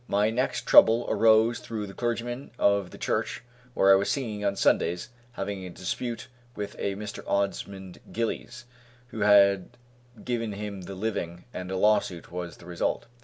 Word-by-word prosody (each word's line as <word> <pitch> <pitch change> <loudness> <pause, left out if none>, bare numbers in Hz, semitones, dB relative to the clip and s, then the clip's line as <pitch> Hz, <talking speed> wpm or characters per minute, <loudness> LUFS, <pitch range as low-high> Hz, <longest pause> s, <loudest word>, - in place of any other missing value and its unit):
My 105 +2 +2
next 125 +3 -1
trouble 115 +2 +7
arose 115 +1 +4
through 110 -3 -5
the 95 - -9
clergyman 120 +3 -3
of 100 -2 +2
the - - -12
church - - -2 0.3
where 95 - +5
I - - +9
was 100 +1 +1
singing 110 -7 -2
on 100 -1 +1
Sundays 85 -2 +1 0.2
having 100 -3 -4
a 90 - -6
dispute 115 +6 -4 0.3
with 105 -1 -5
a 100 -1 -1
Mr. 105 +1 -7
Osmond 100 -2 -2
Gillies, 120 +2 -3 0.4
who 110 - -7
had 100 -2 +5 0.6
given 115 -3 -2
him 100 -1 -6
the 95 +2 -8
living, 90 -4 -4
and 90 0 -6
a 95 - -2
lawsuit 100 -5 +1
was 90 -1 -6
the - - -15
result. 85 -1 -2
100 Hz, 165 wpm, -27 LUFS, 95-115 Hz, 0.6 s, I